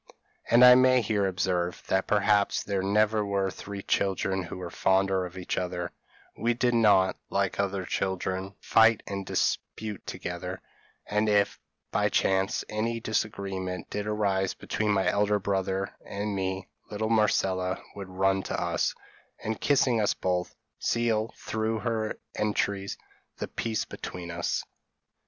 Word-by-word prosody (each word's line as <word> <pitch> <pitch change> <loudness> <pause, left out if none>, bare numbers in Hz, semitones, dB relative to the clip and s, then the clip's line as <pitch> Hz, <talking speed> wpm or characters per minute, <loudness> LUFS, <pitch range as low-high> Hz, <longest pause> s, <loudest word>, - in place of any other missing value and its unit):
And 120 +2 +8
I 125 - +11
may 130 0 +6
here 105 -2 +1
observe, 90 -1 -1
that 95 0 +1
perhaps 105 -1 +3
there 100 -2 -1
never 105 +2 +2
were 100 -1 0
three 100 +1 -7
children 95 -1 0
who 90 - -7
were 90 -2 -6
fonder 95 -1 +2
of 90 +1 -13
each 90 - -2
other; 90 -1 -3 0.4
we 120 +2 0
did 120 0 +2
not, 100 -5 +4
like - - 0
other 100 -1 -1
children, 95 +1 -2
fight 115 0 +5
and 100 0 -4
dispute 105 -3 -2
together; - - -5 0.5
and 105 +1 +1
if, 100 -1 +2 0.3
by - - +2
chance, 95 +2 +1
any 115 +2 -1
disagreement 100 -4 -3
did 105 0 -3
arise 100 -3 0
between 105 +1 -2
my 100 -2 +2
elder 105 0 +2
brother 95 -1 -1
and 100 +1 -3
me, 95 0 -2 0.2
little 110 +1 -2
Marcella 95 -4 +2 0.2
would 100 -2 -7
run 95 +1 +1
to - - -3
us, - - 0 0.5
and 110 0 -3
kissing 130 -5 +3
us 105 - +2
both, 90 -1 -1 0.2
seal, 115 -2 +1
through 110 0 -2
her 110 -1 -1 0.2
entreaties, 100 -2 -1 0.4
the - - -4
peace 110 -1 -2
between 85 -1 -7
us. 85 0 -1
100 Hz, 140 wpm, -28 LUFS, 95-110 Hz, 0.5 s, I